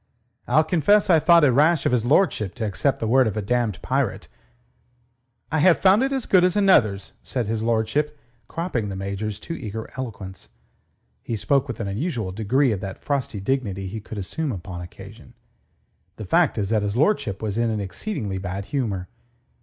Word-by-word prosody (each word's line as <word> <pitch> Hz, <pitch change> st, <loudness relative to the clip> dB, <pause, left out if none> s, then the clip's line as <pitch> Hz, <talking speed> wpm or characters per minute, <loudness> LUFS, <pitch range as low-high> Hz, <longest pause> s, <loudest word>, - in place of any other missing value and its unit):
I'll 150 Hz, +6 st, +4 dB
confess 180 Hz, +5 st, +3 dB
I 165 Hz, -, +6 dB
thought 170 Hz, +1 st, +5 dB
it 140 Hz, -, +5 dB
rash 150 Hz, +4 st, +3 dB
of -, -, +2 dB
his 120 Hz, -2 st, +1 dB
lordship 130 Hz, -, +2 dB
to 115 Hz, -, -3 dB
accept 110 Hz, +7 st, 0 dB
the 110 Hz, -, -2 dB
word 130 Hz, +2 st, +4 dB
of 110 Hz, -, -3 dB
a -, -, 0 dB
damned 115 Hz, -4 st, 0 dB
pirate...." -, -, -1 dB, 1.2 s
"I 160 Hz, -, +1 dB
have 175 Hz, +2 st, +5 dB
found 195 Hz, +4 st, +4 dB
it 270 Hz, +1 st, +1 dB
as 265 Hz, -3 st, -2 dB
good 185 Hz, -2 st, +4 dB
as 180 Hz, -1 st, +2 dB
another's," 110 Hz, -, +3 dB
said 125 Hz, -3 st, -3 dB
his 110 Hz, +1 st, -2 dB
lordship, 115 Hz, +7 st, 0 dB, 0.3 s
cropping 130 Hz, -, -3 dB
the 95 Hz, -, -5 dB
Major's 100 Hz, +2 st, -4 dB
too 165 Hz, -, -6 dB
eager 110 Hz, -7 st, -6 dB
eloquence. 105 Hz, -8 st, -7 dB, 0.7 s
He 115 Hz, -, -4 dB
spoke 135 Hz, +6 st, +1 dB
with 120 Hz, -, -6 dB
an 105 Hz, -, -3 dB
unusual 110 Hz, -, -3 dB
degree 115 Hz, +7 st, +1 dB
of 105 Hz, -, -2 dB
that 95 Hz, -1 st, -7 dB
frosty 140 Hz, -6 st, -2 dB
dignity 100 Hz, -4 st, -2 dB
he 110 Hz, +3 st, -6 dB
could 110 Hz, -, -9 dB
assume 135 Hz, -, -3 dB
upon 90 Hz, -3 st, -6 dB
occasion. 100 Hz, +7 st, -12 dB, 0.8 s
The -, -, -7 dB
fact -, -, +2 dB
is 100 Hz, -2 st, -1 dB
that 110 Hz, -1 st, +2 dB
his 105 Hz, +2 st, -2 dB
lordship 135 Hz, -, +1 dB
was 110 Hz, 0 st, -3 dB
in 120 Hz, -1 st, +1 dB
an 110 Hz, -1 st, -1 dB
exceedingly 100 Hz, -, -4 dB
bad 95 Hz, +1 st, -5 dB
humour. 100 Hz, -10 st, -1 dB
115 Hz, 185 wpm, -23 LUFS, 100-150 Hz, 1.2 s, I